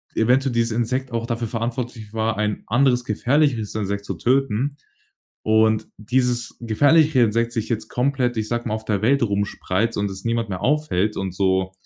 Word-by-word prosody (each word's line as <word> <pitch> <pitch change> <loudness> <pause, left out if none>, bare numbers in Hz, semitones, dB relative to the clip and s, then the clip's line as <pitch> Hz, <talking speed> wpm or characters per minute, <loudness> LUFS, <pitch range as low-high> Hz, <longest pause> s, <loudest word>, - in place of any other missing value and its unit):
eventuell 125 +3 +2
dieses 115 0 +1
Insekt 125 +3 -1
auch 115 -1 -2
dafür 115 -1 -2
verantwortlich 115 -1 -4
war, 110 0 -1
ein 105 -1 -1
anderes 125 +1 +2
gefährlicheres 125 0 +1
Insekt 100 -1 -2
zu 95 - -3
töten. 135 - 0 0.7
Und 110 0 +2
dieses 120 +1 -1
gefährlichere 145 +4 +4
Insekt 115 +2 0
sich 115 -2 -3
jetzt 110 -1 -2
komplett 125 -1 0
ich 110 -1 -2
sage 120 +1 -2
mal, 110 - -1
auf 110 0 -5
der 105 -3 0
Welt 135 +4 +3
rumspreizt 100 +1 -1
und 100 -1 -1
es 95 0 -8
niemand 115 -2 -1
mehr 95 -1 -4
aufhält 125 -8 +1
und 95 -2 -3
so, 95 -1 +1
115 Hz, 170 wpm, -22 LUFS, 105-125 Hz, 0.7 s, gefährlichere